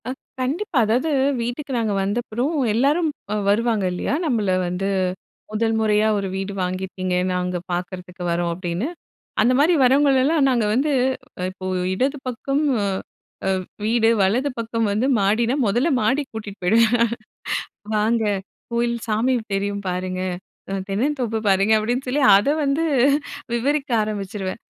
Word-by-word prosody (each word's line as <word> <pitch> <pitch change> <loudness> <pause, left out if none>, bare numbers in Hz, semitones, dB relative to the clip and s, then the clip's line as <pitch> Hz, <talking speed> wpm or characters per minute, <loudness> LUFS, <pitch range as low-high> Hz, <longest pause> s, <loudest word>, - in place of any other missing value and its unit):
அ, - - -2 0.3
கண்டிப்பா. 300 +6 -2
அதாவது 245 +9 +1 0.3
வீட்டுக்கு 245 +5 -4
நாங்க 220 -3 0
வந்தப்புறம் 240 +7 -1 0.2
எல்லாரும் 290 +8 +2 0.4
வருவாங்க 220 0 +2
இல்லையா! 180 +8 -2
நம்மள 220 -9 +1 0.2
வந்து 180 +2 -2 0.6
"முதல் 225 +1 0
முறையா 215 0 +3
ஒரு 200 -1 -2
வீடு 195 +1 -3
வாங்கியிருக்கீங்க, 185 0 -2 0.2
நாங்க 180 0 -1
பார்க்குறதுக்கு 180 0 -5
வரோம்," 170 0 0
அப்படின்னு. 175 +6 -3 0.5
அந்த 250 - +4
மாதிரி 315 +5 +5
வர்றவங்களெல்லாம், 275 +3 +4
நாங்க 240 -4 +2
வந்து 280 +6 +1 0.6
இப்போ 185 0 -10 0.3
இடது 265 +9 0
பக்கம், 275 +4 -1 0.2
அ - - 0 0.6
அ - - +2 0.4
வீடு 225 0 +3
வலது 235 +9 +2
பக்கம் 230 0 -1
வந்து 215 +5 +1
மாடின்னா 225 +5 +2
மொதல்ல 240 +10 +2
மாடிக்கு 265 +6 0
கூட்டிட்டு 205 -3 -7
போயிடுவேன். 230 +5 +4 1.0
"வாங்க 220 +2 +2 0.5
கோயில் 235 0 0
சாமி 225 +4 +1 0.2
தெரியும் 200 +1 -2
பாருங்க. 185 0 -3 0.5
அ - - -1 0.2
தென்னந்தோப்பு 235 +1 0
பாருங்க" 195 +3 +4
அப்படின்னு 245 +5 -1
சொல்லி 275 +3 +1
அத 200 +5 +3 0.2
வந்து 285 +4 +1 0.7
விவரிக்க 280 +4 0
ஆரம்பிச்சுருவேன். 200 -1 -4
225 Hz, 130 wpm, -22 LUFS, 195-255 Hz, 1.0 s, மாதிரி